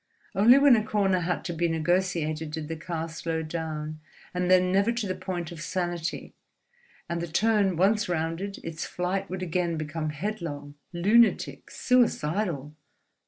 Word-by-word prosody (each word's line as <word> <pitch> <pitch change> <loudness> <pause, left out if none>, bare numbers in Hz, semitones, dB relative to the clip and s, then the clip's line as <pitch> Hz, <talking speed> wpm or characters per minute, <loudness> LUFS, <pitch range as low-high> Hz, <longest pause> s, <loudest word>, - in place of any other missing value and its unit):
Only 230 +7 +7
when 280 -2 +7
a 215 - +1
corner 195 -3 +1
had 175 0 -2
to 175 - -3
be 170 +1 +1
negotiated 165 -2 0
did 155 0 -5
the 165 - -3
car 165 0 -4
slow 165 0 -3
down, 155 -1 -4 0.3
and 180 0 -1
then 185 0 +5
never 200 +4 +3
to 235 -2 -2
the 185 - -1
point 185 -2 -5
of 165 -3 -8
sanity; 175 -1 -3 0.7
and 170 0 -2
the 170 - -3
turn 200 +2 +2
once 210 +3 +2
rounded, 170 +4 -2
its 165 -1 -5
flight 190 +2 -2
would 185 0 -4
again 170 -1 -1
become 155 0 -3
headlong, 150 -4 -5 0.2
lunatic, 210 +7 +2
suicidal. 175 - +1
175 Hz, 155 wpm, -27 LUFS, 160-195 Hz, 0.7 s, Only